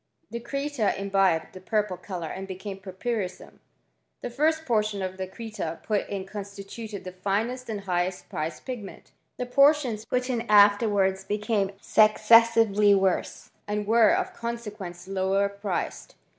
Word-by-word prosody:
The 235 - -4
creta 275 -2 -1
imbibed 195 -4 +1
the 185 - -9
purpli 205 -1 -1
colour 180 -4 -5
and 195 0 -6
became 190 +1 -7
purpurissum. 190 0 -5 0.6
The 245 - -5
first 315 +5 +1
portion 215 -5 0
cl 185 -1 -2 0.2
creta 200 -6 -6
put 210 -2 -1
in 195 -2 -4
constituted 200 +1 -8
the 185 - -7
finest 215 +7 -2
and 210 -2 -3
highest 180 -1 -2
pricat 155 +2 -5
pigment. 240 -7 -8 0.3
The 250 - -2
portions 260 -4 +3
put 250 0 -1
in 245 -3 -1
afterws^s 205 -2 +4
becam 210 -1 0
successively 215 -1 +5
worse, 190 -1 -1 0.2
and 210 0 -2
were, 225 0 +5
of - - 0
consequence 210 -7 -6
loww 195 +1 +1
priced. 195 -4 -3
205 Hz, 135 wpm, -26 LUFS, 190-230 Hz, 0.6 s, successively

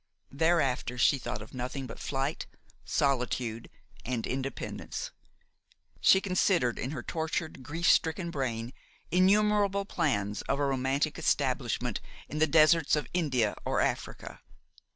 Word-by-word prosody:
Thereafter 140 -5 +1
she 135 +2 +4
thought 115 - -5
of 110 - -15
nothing 130 +2 -4
but 120 - -9
flight, 135 +2 -2 0.4
solitude 125 -4 -1 0.3
and 120 -2 -2
independence; 135 +1 -4 0.9
she 190 - +6
considered 180 - +1
in 130 - -2
her 155 - -5
tortured, 160 -2 -3
grief 165 +6 -2
stricken 170 +1 +3
brain 120 -4 -3 0.4
innumerable 200 +1 +3
plans 105 - -1
of 135 - +2
a 145 - +1
romantic 135 +2 0
establishment - - 0 0.3
in 150 - -5
the 160 - +4
deserts 155 0 +5
of 150 - -2
India 130 -11 +1
or - - 0
Africa. - - -3
140 Hz, 125 wpm, -29 LUFS, 125-170 Hz, 0.9 s, she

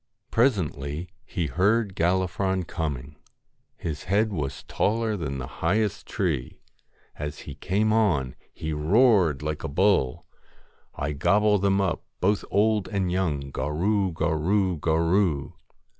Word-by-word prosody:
Presently 85 - 0 0.2
he 90 -5 -2
heard 100 - +1
Gallifron 95 +2 +1
coming. 75 -4 -4 0.6
His 75 -3 -5
head 105 +3 +1
was 75 -6 -4
taller 110 +1 0
than 75 -7 -3
the 65 - -4 0.2
highest 105 -1 0
tree. 80 -10 -2 0.6
As 75 0 -5
he 70 - -8
came 100 +9 0
on, 85 - +2 0.2
he 80 0 -4
roared 85 - +3
like 75 0 -3
a - - -2
bull 85 -5 +2 0.7
1 70 - -2
1 75 - -6
gobble 105 +5 +3
them 100 0 +2
up, 95 -4 0 0.2
both 100 +1 +1
old 105 -1 +2
and 95 -4 -1
young, 75 -7 -1
Gorroo 90 +9 0
gorroo 85 +3 +1
gorroo. 80 -1 +1
90 Hz, 130 wpm, -26 LUFS, 75-100 Hz, 0.7 s, roared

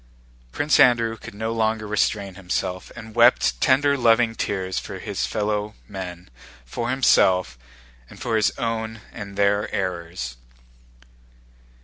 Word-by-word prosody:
Prince 145 - +2
Andrew 115 -2 +4
could 105 - -11
no 110 +2 -3
longer 110 -1 0
restrain 100 -1 0
himself 90 0 -3
and 110 -2 -10
wept 120 +2 +4
tender 140 +2 +4
loving 115 -2 +3
tears 95 -4 -2
for - - -7
his 60 - -3
fellow 105 +4 -2
men, 90 -3 -7 0.4
for 115 - -4
himself, 95 - +3 0.5
and - - -14
for 120 -3 -1
his 110 -1 +3
own 110 -2 -3
and 100 -2 -8
their 100 +1 +2
errors. 85 -9 -4
105 Hz, 125 wpm, -23 LUFS, 95-115 Hz, 0.5 s, Andrew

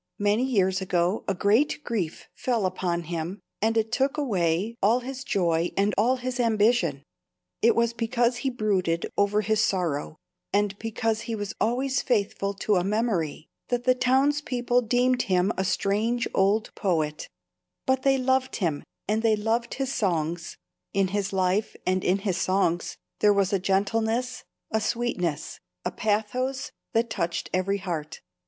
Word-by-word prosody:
Many 205 +4 +2
years 190 -6 +1
ago 180 +1 0
a 195 - 0
great 220 +11 +2
grief 190 -9 -3
fell 235 -6 0
upon 180 -2 -1
him, 170 +4 -4 0.2
and 225 +2 +2
it 220 0 +1
took 270 +3 +1
away 195 - 0
all 225 +5 +3
his 260 +1 -6
joy 170 -7 +1
and 200 +1 +2
all 240 +5 +3
his 255 0 -4
ambition. 215 - +2 0.6
It 235 - +5
was 235 0 +2
because 240 +1 +1
he 265 +2 -1
brooded 195 -8 0
over 205 +1 +2
his 215 +1 +1
sorrow, 170 -7 -1 0.3
and 205 0 +1
because 225 0 -1
he 230 - -1
was 205 0 -4
always 260 +4 +1
faithful 200 -4 0
to 200 0 +1
a 180 - +1
memory, 195 -7 -1 0.2
that 245 -1 -1
the 255 - +5
townspeople 255 -1 +2
deemed 250 +1 +3
him 185 +3 +3
a 190 - 0
strange 215 +5 0
old 200 +3 +2
poet; 155 -6 -1 0.6
but 260 0 +2
they 270 0 +3
loved 260 0 +1
him 165 -8 -1 0.3
and 215 +2 +1
they 225 -1 +3
loved 225 +3 -1
his 270 0 -2
songs, 170 -4 -1 0.4
in 195 -1 +2
his 200 0 -1
life 190 +2 0
and 185 0 +1
in 185 +2 +3
his 195 -2 -1
songs 185 -3 0 0.2
there 210 - +5
was 200 -1 +1
a 195 - +3
gentleness, 225 +6 0 0.3
a 220 - +1
sweetness, 180 -11 -2 0.3
a 180 - 0
pathos 250 +7 -1 0.2
that 230 0 +1
touched 170 -4 -2
every 190 +2 +1
heart. 170 -6 -5
210 Hz, 155 wpm, -26 LUFS, 185-240 Hz, 0.6 s, It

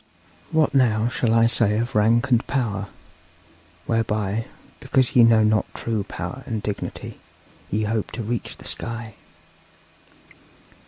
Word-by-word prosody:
'What 160 -2 +2
now 115 -4 +3
shall 120 -1 0
I 115 0 +5
say 115 -3 +2
of 120 +2 -2
rank 115 +5 +3
and 120 0 +3
power, 110 -7 -1 1.0
whereby, 110 -1 -1 0.3
because 130 -2 +1
ye 120 - +8
know 115 -1 +6
not 110 0 +1
true 110 -3 -2
power 130 +5 -6
and 110 -4 -3
dignity, 105 - -5 0.5
ye 110 +2 0
hope 110 0 -1
to 115 - -4
reach 115 +2 -4
the - - -14
sky? 115 -1 -4
115 Hz, 130 wpm, -23 LUFS, 105-120 Hz, 1.0 s, ye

